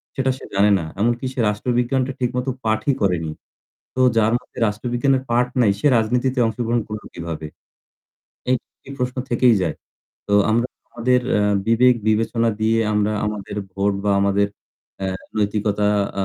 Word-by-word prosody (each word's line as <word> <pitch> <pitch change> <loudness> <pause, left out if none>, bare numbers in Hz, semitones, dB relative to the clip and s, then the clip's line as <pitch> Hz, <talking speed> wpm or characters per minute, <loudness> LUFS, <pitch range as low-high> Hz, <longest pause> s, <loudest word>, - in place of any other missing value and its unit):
সেটা 130 -1 +1
সে - - -11
জানে 100 +1 +4
না। 80 - -4 0.2
এমনকি 120 +3 +1
সে 130 - -7
রাষ্ট্রবিজ্ঞানটা 125 +4 0
ঠিকমতো 125 +1 -1 0.2
পাঠই 110 +5 +1
করেনি। 85 -5 0 0.6
তো 130 - +1 0.2
যার 110 +1 +3
মধ্যে - - -13
রাষ্ট্রবিজ্ঞানের 125 +5 0
পাঠ 125 +1 +3
নাই 105 -4 +4
সে 145 - +3
রাজনীতিতে 125 +4 0
অংশগ্রহণ 115 +1 -1
করল 105 -1 -6
কিভাবে? 80 -2 -5 1.0
এই 130 - +4 0.3
এই 140 - -8
প্রশ্ন 125 0 -2
থেকেই 120 0 +4
যায়। 80 -4 -2 0.5
তো 100 - +2 0.2
আমরা 120 +2 +2 0.2
আমাদের 125 +2 +2 0.2
এ - - +2 0.3
বিবেক 125 +2 +5
বিবেচনা 115 +2 +1
দিয়ে 110 +1 +2 0.2
আমরা 105 0 +1
আমাদের 105 -1 -5 0.2
ভোট 100 +1 +1
বা 100 - +3
আমাদের 100 +1 +2 0.6
এ - - 0 0.3
নৈতিকতা 105 0 0 0.4
আ - - +1
115 Hz, 150 wpm, -21 LUFS, 105-125 Hz, 1.0 s, বিবেক